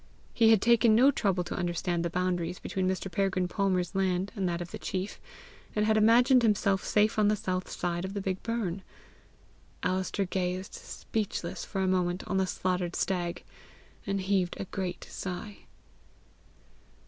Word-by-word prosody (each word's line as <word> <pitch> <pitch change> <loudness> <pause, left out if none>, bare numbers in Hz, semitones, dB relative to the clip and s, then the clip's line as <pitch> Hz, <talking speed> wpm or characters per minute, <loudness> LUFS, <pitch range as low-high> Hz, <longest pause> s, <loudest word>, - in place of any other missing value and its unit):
He 225 -2 +5
had 220 -3 +5
taken 230 -1 +5
no 260 +5 +6
trouble 190 -8 0
to 175 - -5
understand 175 0 -1
the 170 - -1
boundaries 180 0 -1
between 190 -1 -2
Mr. 190 0 -3
Peregrine 190 0 +1
Palmer's 185 -2 0
land 190 0 0
and 190 -4 0
that 170 0 -2
of 175 0 -6
the - - -6
chief, 190 +1 -4 0.6
and 210 0 +2
had 220 0 +3
imagined 240 +4 +6
himself 200 -3 +2
safe 210 +1 +2
on 210 - +4
the 210 - +3
south 185 -2 -3
side 175 0 -2
of 190 +2 -5
the 200 - -2
big 190 -1 -2
burn. 210 -6 -2 1.0
Alister 190 +2 0
gazed 185 +1 -2
speechless 205 -5 -4
for 195 - -3
a 190 - +1
moment 180 -1 +1
on 190 - 0
the 190 0 +2
slaughtered 180 -1 -1
stag, 175 -3 -1 0.6
and 195 0 0
heaved 190 -2 0
a - - -3
great 185 -2 -4
sigh. 195 +3 -7
190 Hz, 165 wpm, -29 LUFS, 180-205 Hz, 1.0 s, no